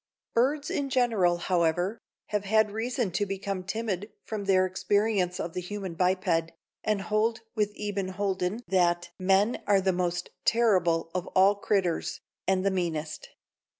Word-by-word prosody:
Birds 280 Hz, +5 st, +1 dB
in 280 Hz, -1 st, -1 dB
general, 225 Hz, -9 st, +2 dB
however, 175 Hz, +4 st, 0 dB, 0.3 s
have 210 Hz, -1 st, -1 dB
had 215 Hz, +1 st, +3 dB
reason 230 Hz, -1 st, -1 dB
to 180 Hz, +4 st, 0 dB
become 195 Hz, -1 st, -3 dB
timid 205 Hz, 0 st, -3 dB
from 210 Hz, -2 st, -4 dB
their 185 Hz, -1 st, +4 dB
experience 190 Hz, -1 st, 0 dB
of 165 Hz, -, -4 dB
the 180 Hz, -, -3 dB
human 190 Hz, -1 st, -5 dB
biped, 180 Hz, -2 st, +1 dB, 0.3 s
and 210 Hz, -2 st, 0 dB
hold 220 Hz, +2 st, 0 dB
with 210 Hz, -2 st, 0 dB
Eben 205 Hz, -2 st, -2 dB
Holden 190 Hz, +2 st, -2 dB
that 175 Hz, -2 st, +2 dB
"Men 195 Hz, +5 st, +2 dB
are 200 Hz, -1 st, +5 dB
the 190 Hz, 0 st, +1 dB
most 175 Hz, -1 st, -2 dB
terrible 180 Hz, -8 st, +2 dB
of 180 Hz, -1 st, -2 dB
all 195 Hz, +2 st, +6 dB
critters, 195 Hz, -4 st, -1 dB, 0.3 s
an' 190 Hz, -1 st, +2 dB
the 195 Hz, -, +2 dB
meanest. 160 Hz, -4 st, -3 dB
195 Hz, 150 wpm, -28 LUFS, 180-210 Hz, 0.3 s, all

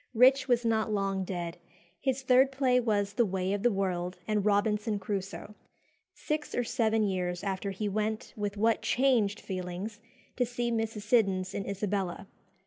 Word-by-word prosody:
Rich 260 Hz, +4 st, +6 dB
was 245 Hz, -2 st, +2 dB
not 220 Hz, -1 st, +1 dB
long 195 Hz, -2 st, 0 dB
dead. 175 Hz, -2 st, -4 dB, 0.4 s
His 265 Hz, -1 st, -1 dB
third 260 Hz, +1 st, +5 dB
play 260 Hz, -2 st, +3 dB
was 205 Hz, -4 st, 0 dB
"The 235 Hz, -, +3 dB
Way 185 Hz, +1 st, 0 dB
of 205 Hz, -, -1 dB
the 240 Hz, -, +4 dB
World" 180 Hz, -2 st, -2 dB
and 210 Hz, -2 st, +1 dB
"Robinson 210 Hz, +1 st, +1 dB
Crusoe." 195 Hz, +1 st, -4 dB, 0.6 s
Six 300 Hz, 0 st, -3 dB
or 245 Hz, -, +1 dB
seven 225 Hz, -2 st, +1 dB
years 180 Hz, -2 st, -1 dB
after 195 Hz, 0 st, -2 dB
he 195 Hz, +2 st, -3 dB
went 215 Hz, +2 st, -2 dB
(with 205 Hz, -1 st, -3 dB
what 225 Hz, +2 st, +2 dB
changed 240 Hz, -6 st, +2 dB
feelings!) 185 Hz, +3 st, -5 dB, 0.4 s
to 250 Hz, -, +3 dB
see 240 Hz, 0 st, -2 dB
Mrs. 225 Hz, -2 st, -2 dB
Siddons 195 Hz, -4 st, +2 dB
in 195 Hz, -, -4 dB
Isabella. 200 Hz, -2 st, -2 dB
210 Hz, 160 wpm, -30 LUFS, 195-235 Hz, 0.6 s, Rich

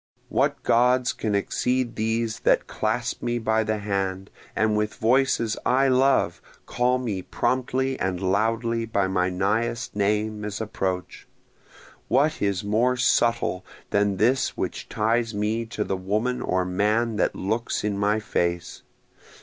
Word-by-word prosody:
What -, -, 0 dB
gods 125 Hz, +1 st, +3 dB
can 105 Hz, -2 st, -2 dB
exceed 125 Hz, +4 st, 0 dB
these 110 Hz, 0 st, -1 dB
that -, -, +2 dB
clasp 115 Hz, +2 st, -2 dB
me 120 Hz, 0 st, -1 dB
by 110 Hz, -1 st, +1 dB
the 110 Hz, 0 st, -1 dB
hand, 95 Hz, -2 st, -3 dB, 0.2 s
and 110 Hz, -1 st, +2 dB
with 105 Hz, 0 st, -1 dB
voices 115 Hz, -2 st, +2 dB
I 135 Hz, +2 st, +3 dB
love 130 Hz, +1 st, +2 dB, 0.2 s
call 125 Hz, +1 st, +1 dB
me 110 Hz, -7 st, -3 dB
promptly 130 Hz, +5 st, -1 dB
and 95 Hz, -1 st, -1 dB
loudly 115 Hz, +4 st, 0 dB
by 100 Hz, -3 st, +1 dB
my 90 Hz, -1 st, +1 dB
nighest 110 Hz, +6 st, -1 dB
name 105 Hz, +1 st, 0 dB
as 105 Hz, -1 st, -4 dB
approach? 95 Hz, -4 st, -4 dB, 0.8 s
What 150 Hz, +5 st, +2 dB
is 100 Hz, 0 st, 0 dB
more 115 Hz, +5 st, +1 dB
subtle 115 Hz, -7 st, +2 dB, 0.3 s
than 100 Hz, -1 st, +2 dB
this 125 Hz, +6 st, +1 dB
which -, -, -4 dB
ties 115 Hz, +1 st, 0 dB
me 110 Hz, +2 st, -1 dB
to 110 Hz, -2 st, -3 dB
the 95 Hz, -, -2 dB
woman 110 Hz, +7 st, -1 dB
or 95 Hz, -4 st, 0 dB
man 105 Hz, +5 st, +1 dB
that -, -, +1 dB
looks 110 Hz, +5 st, -2 dB
in 105 Hz, -1 st, -1 dB
my 105 Hz, +2 st, +1 dB
face? 85 Hz, -4 st, -2 dB
110 Hz, 140 wpm, -25 LUFS, 100-120 Hz, 0.8 s, gods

